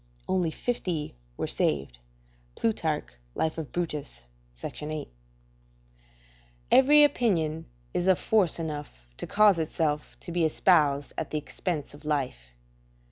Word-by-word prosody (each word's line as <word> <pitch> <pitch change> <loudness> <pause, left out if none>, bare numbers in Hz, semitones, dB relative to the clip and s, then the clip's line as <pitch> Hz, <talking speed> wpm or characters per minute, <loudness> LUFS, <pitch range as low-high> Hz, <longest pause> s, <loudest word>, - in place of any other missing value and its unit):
["Only 180 -3 +1
fifty 170 -5 -2 0.2
were - - -1
saved." 70 -4 -1 0.6
Plutarch, 160 -9 0 0.3
Life 160 +1 -1
of 155 - -6
Brutus, 150 - -4 0.3
c. - - -5
8.] 150 0 -5 1.6
Every 295 +3 +7
opinion 170 - +1 0.3
is 175 - 0
of 190 -2 +5
force 205 -6 +2
enough 150 - -6
to - - -5
cause 205 -4 +5
itself 150 -1 -1
to - - -7
be 170 0 +1
espoused 150 -3 +3
at - - -4
the 155 - -2
expense 150 0 -4
of 145 - -14
life. 125 - -3
160 Hz, 125 wpm, -28 LUFS, 150-180 Hz, 1.6 s, Every